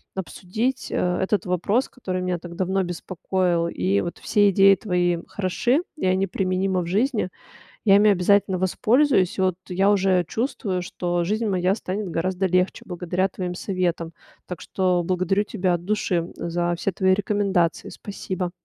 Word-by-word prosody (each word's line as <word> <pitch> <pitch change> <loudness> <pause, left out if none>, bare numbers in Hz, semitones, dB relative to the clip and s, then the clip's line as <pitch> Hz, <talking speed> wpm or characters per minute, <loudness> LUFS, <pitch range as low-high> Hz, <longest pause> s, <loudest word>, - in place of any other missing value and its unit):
обсудить 195 - -3
э, 180 0 0
этот 205 +2 0
вопрос, 200 +8 +1
который 185 -7 -4
меня 180 -1 -1
так 170 0 -9
давно 190 +1 0
беспокоил. 175 0 -1
И 95 - 0
вот 170 - -5
все 205 -1 +3
идеи 195 +1 +6
твои 175 -3 0
хороши, 240 - 0 0.2
и - - -3
они 185 +1 +2
применимы 185 0 0
в - - -4
жизни. 215 +1 0 0.6
Я 195 -2 +6
ими 210 +1 +5
обязательно 190 0 +3
воспользуюсь. 215 +2 +2
И - - +2
вот 185 -1 +2
я 190 +2 +2
уже 190 -3 +2
чувствую, 210 - -2
что 175 -1 -2
жизнь 215 +4 -1
моя 185 0 +1
станет 195 -2 -4
гораздо 185 +3 -1
легче 185 +1 +1
благодаря 180 +1 -1
твоим 180 -1 -5
советам. 175 -3 -2 0.3
Так 180 - -7
что 185 -2 0
благодарю 185 +3 +1
тебя 185 -4 0
от 175 0 -4
души 185 -4 0
за 175 0 -1
все 185 - -1
твои 190 0 +2
рекомендации. 195 -4 0
Спасибо. 185 -3 -5
185 Hz, 160 wpm, -23 LUFS, 175-200 Hz, 0.6 s, идеи